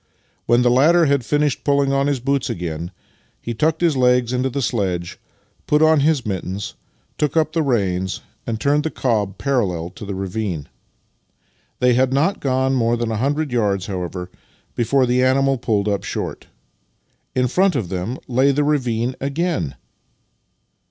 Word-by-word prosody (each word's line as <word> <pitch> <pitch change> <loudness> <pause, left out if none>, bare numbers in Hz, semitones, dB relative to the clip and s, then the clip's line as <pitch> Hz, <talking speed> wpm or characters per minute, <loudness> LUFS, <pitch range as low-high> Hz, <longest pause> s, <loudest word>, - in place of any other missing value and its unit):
When 120 +1 +4
the 120 - +4
latter 160 +7 +5
had 140 -3 +2
finished 145 +1 0
pulling 140 -1 +2
on 140 0 +2
his 140 -3 0
boots 135 +1 0
again, 85 -1 -4 0.5
he 120 - -5
tucked 155 +7 0
his 165 -4 +3
legs 125 -1 +3
onto 125 +1 0
the 140 - -3
sledge, 95 -8 -2 0.5
put 150 +1 +3
on 155 -1 +5
his 145 -2 +2
mittens, 95 0 -4 0.5
took 150 +2 0
up 155 -1 +2
the 165 - +1
reins, 95 -9 0 0.3
and 110 -1 -2
turned 145 +3 +2
the 160 - -1
cob 105 -9 -1
parallel 95 -11 -1
to 105 - -11
the 100 -1 -4
ravine. 95 -5 -3 1.1
They 125 0 +3
had 130 +1 +2
not 150 +9 +1
gone 130 0 +1
more 120 -2 +2
than 120 -1 -2
a 110 - -1
hundred 145 +4 -1
yards, 100 -6 0
how 95 -3 -4
ever, 90 0 -6 0.4
before 130 +3 +2
the 125 +1 +2
animal 135 0 +2
pulled 105 -4 0
up 100 -1 0
short. - - -5 0.9
In 125 0 +2
front 185 +6 +2
of 110 -10 -2
them 95 +8 -3
lay 130 +3 +3
the 145 +2 +1
ravine 125 -4 0
again! 140 - -1
125 Hz, 165 wpm, -20 LUFS, 105-140 Hz, 1.1 s, latter